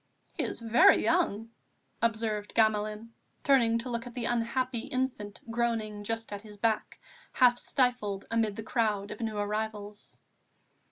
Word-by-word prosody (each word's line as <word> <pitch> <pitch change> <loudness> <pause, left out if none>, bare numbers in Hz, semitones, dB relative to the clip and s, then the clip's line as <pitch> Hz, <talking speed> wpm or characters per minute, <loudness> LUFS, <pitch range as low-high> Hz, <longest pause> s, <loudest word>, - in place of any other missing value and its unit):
"He - - -2
is - - -3
very 235 - +5
young," 230 - +1 0.5
observed 220 -2 -1
Gamelin, 215 0 +1 0.3
turning 235 -5 +4
to 235 +2 -5
look 235 +1 -3
at 240 - -11
the 245 -2 -3
unhappy 240 +1 0
infant 255 -6 -3
groaning 225 -3 -1
just 225 0 -3
at 200 - -5
his 210 -1 -13
back, 220 +1 -1 0.3
half 245 -1 +5
stifled 245 -7 0
amid 225 -3 +1
the 220 - -6
crowd 210 -3 0
of 210 - -7
new 220 -2 -2
arrivals. 210 0 -4
225 Hz, 145 wpm, -29 LUFS, 210-235 Hz, 0.5 s, very